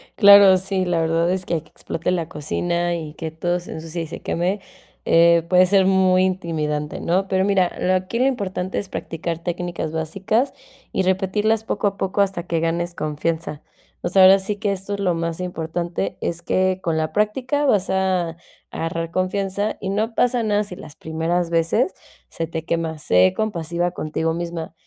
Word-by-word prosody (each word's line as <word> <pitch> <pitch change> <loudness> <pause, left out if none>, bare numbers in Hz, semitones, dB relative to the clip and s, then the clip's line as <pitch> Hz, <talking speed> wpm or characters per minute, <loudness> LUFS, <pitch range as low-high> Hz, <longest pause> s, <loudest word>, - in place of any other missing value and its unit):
Claro, 200 -2 +8
sí, 190 0 -1
la 175 -2 +1
verdad 165 +1 +1
es 185 0 -2
que 170 - -1
ahí 160 - -1
que 155 - -23
explote 165 +2 -3
la 170 -3 -1
cocina 175 +3 -1
y 155 -3 -6
que 160 -1 -5
todo 175 +2 -1
se 175 - -9
ensucie 165 +1 -5
y - - -7
se 165 - -8
queme, 185 +4 -1 0.4
eh, 170 0 +5
puede 185 0 +6
ser 190 +1 +4
muy 185 -1 +4
intimidante, 155 -5 -2
¿no?, 185 +3 +1
pero 190 0 +1
mira, 190 -2 +2
lo 185 - +2
aquí 185 +5 -1
lo 255 - +3
importante 190 -7 -2
es 200 - -5
practicar 165 -2 -4
técnicas 175 -2 -3
básicas 195 - -1 0.4
y 190 - +1
repetirlas 205 +4 +1
poco 205 -1 0
a 195 - -3
poco 195 +1 0
hasta 195 -3 0
que 165 -1 0
ganes 170 +1 -1
confianza, 155 0 -3 0.4
o - - -2
sea, 190 +1 +5
ahora 190 +1 +8
sí 195 +2 -3
que 205 0 -1
esto 195 +1 -4
es 200 - -3
lo 185 -3 +2
más 165 0 -3
importante, 175 +1 -3
es 170 0 -3
que 185 +2 +1
con 165 -3 -1
la 155 0 -1
práctica 255 +7 0
vas 205 -8 +2
a 185 -3 0 0.3
agarrar 165 0 -3
confianza 195 +2 -1
y 190 - -3
no 215 +3 -1
pasa 245 -1 +2
nada 210 -1 +1
si 200 -3 -7
las 150 -1 -11
primeras 165 +2 -1
veces 170 - +1 0.4
se 165 - -4
te 160 -1 -5
quema, 165 -1 -2
sé 90 -10 +3
compasiva 175 -4 -1
contigo 160 -1 -2
misma, 170 -1 -5
180 Hz, 190 wpm, -22 LUFS, 165-195 Hz, 0.4 s, Claro